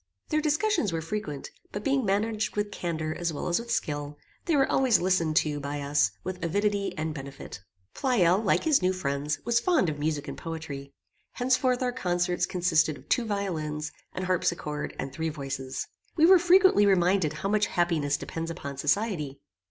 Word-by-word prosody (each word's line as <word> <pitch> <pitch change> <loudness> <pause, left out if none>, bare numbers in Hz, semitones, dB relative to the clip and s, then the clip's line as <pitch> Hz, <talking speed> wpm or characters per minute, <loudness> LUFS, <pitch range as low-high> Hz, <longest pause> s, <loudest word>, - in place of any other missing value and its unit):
Their 310 -1 +1
discussions 310 - +1
were 165 - -1
frequent, 160 -4 -5 0.2
but, 205 - -5
being 275 -1 +1
managed 210 +2 0
with 205 0 -1
candour 160 -4 -3
as 170 +1 -2
well 150 - -4
as 175 - +2
with 235 0 -8
skill, 145 -4 -2 0.3
they 335 - +2
were 270 -1 +4
always 260 -5 +3
listened 170 -4 +1
to 150 -1 +2
by 145 +1 -4
us 145 +1 +2
with 185 0 -5
avidity 200 +4 0
and 155 0 -2
benefit. 140 -8 -8 0.3
Pleyel, 195 -9 +3
like 200 - +2
his 310 -7 +3
new 185 +1 +2
friends, 145 -4 -2
was 235 0 +3
fond 315 - +2
of 145 -1 -4
music 150 -1 -1
and - - -5
poetry. 155 -4 -6 0.4
Henceforth 255 0 +1
our 250 - +1
concerts 175 -5 0
consisted 165 -4 +2
of 130 - -18
two 245 - +2
violins, 155 -8 -3 0.2
an 185 - -3
harpsichord, 170 -4 -1
and 135 0 -5
three 160 +3 -2
voices. 135 -3 -4 0.3
We 320 - +5
were 370 +1 +8
frequently 360 - +5
reminded 180 -4 +3
how 155 +6 -3
much 210 0 +2
happiness 165 -6 +1
depends 165 0 -5
upon 140 -4 -6
society. 150 -3 0
175 Hz, 175 wpm, -27 LUFS, 150-215 Hz, 0.4 s, were